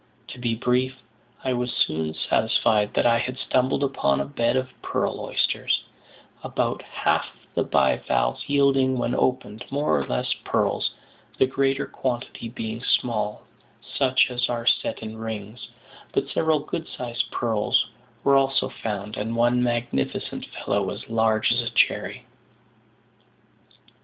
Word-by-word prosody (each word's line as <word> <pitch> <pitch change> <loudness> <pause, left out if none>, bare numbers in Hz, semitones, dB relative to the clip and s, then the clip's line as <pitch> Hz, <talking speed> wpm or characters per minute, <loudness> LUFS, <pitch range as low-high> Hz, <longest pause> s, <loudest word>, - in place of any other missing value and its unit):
To 125 - -9
be 120 -2 0
brief, 125 +2 +1 0.5
I 130 - +1
was 125 0 -1
soon 80 -4 0
satisfied 105 -1 +2
that - - +3
I 115 -1 +5
had 130 +2 -3
stumbled 130 +1 +1
upon 70 - +1
a 70 - 0
bed 115 - 0
of 130 0 0
pearl - - -1
oysters, - - 0 0.6
about - - -1
half - - 0
of - - -28
the - - +1
bivalves 60 - +1
yielding 135 -2 +3
when 120 - 0
opened 120 -3 0
more 145 +2 +1
or 70 - -3
less 60 - 0
pearls, - - +1 0.5
the - - +5
greater 135 +1 +1
quantity 120 -2 -3
being 115 -1 -5
small, 110 -5 0 0.5
such 130 -2 +3
as 125 0 -1
are 120 -1 -2
set 115 - +1
in 110 0 -7
rings; 110 0 -6 0.4
but - - +1
several 160 -2 +2
good 165 +2 -4
sized 120 -1 -3
pearls 110 -3 +1 0.4
were 140 - +5
also 135 0 +2
found, 105 -1 -4
and 110 +2 -2
one 120 +1 +3
magnificent 120 - -1
fellow, - - -1
as - - -7
large 110 -1 +3
as 120 +1 +2
a 120 - -3
cherry. - - +1
120 Hz, 140 wpm, -25 LUFS, 110-130 Hz, 0.6 s, I